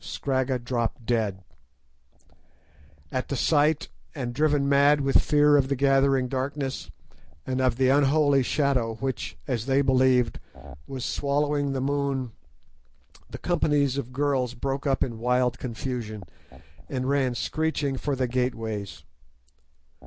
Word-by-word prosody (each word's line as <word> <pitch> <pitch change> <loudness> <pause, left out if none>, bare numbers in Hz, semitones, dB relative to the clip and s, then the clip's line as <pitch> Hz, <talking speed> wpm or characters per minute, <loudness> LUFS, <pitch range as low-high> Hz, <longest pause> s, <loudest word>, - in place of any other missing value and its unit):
Scragga 130 -1 -1
dropped 120 -1 -3
dead. 105 -5 -1 1.7
At 130 - -2
the 140 - -3
sight, 150 +3 +2 0.3
and 125 -4 -4
driven 145 0 +2
mad 140 +1 +4
with 135 0 +3
fear 150 -1 +4
of 135 -2 +2
the 140 - 0
gathering 135 -1 +3
darkness, 135 +1 -3 0.6
and 130 0 -1
of 130 -2 +2
the 130 +1 +2
unholy 140 0 +4
shadow 130 -4 0
which, 130 - -4
as 120 -1 -2
they 135 +1 +3
believed, 130 -2 +3 0.5
was 130 -2 -5
swallowing 145 0 0
the 135 - -2
moon, 140 -2 -1 1.0
the - - -7
companies 145 -6 +1
of 130 -2 -6
girls 130 -2 0
broke 135 +3 -3
up 135 -1 +1
in 115 -3 -4
wild 125 +1 +1
confusion, 115 -4 -5 0.7
and 130 -1 -2
ran 135 -3 +1
screeching 150 -1 -1
for 140 +2 -2
the 130 -1 0
gateways. 115 -5 -3
135 Hz, 130 wpm, -26 LUFS, 125-140 Hz, 1.7 s, mad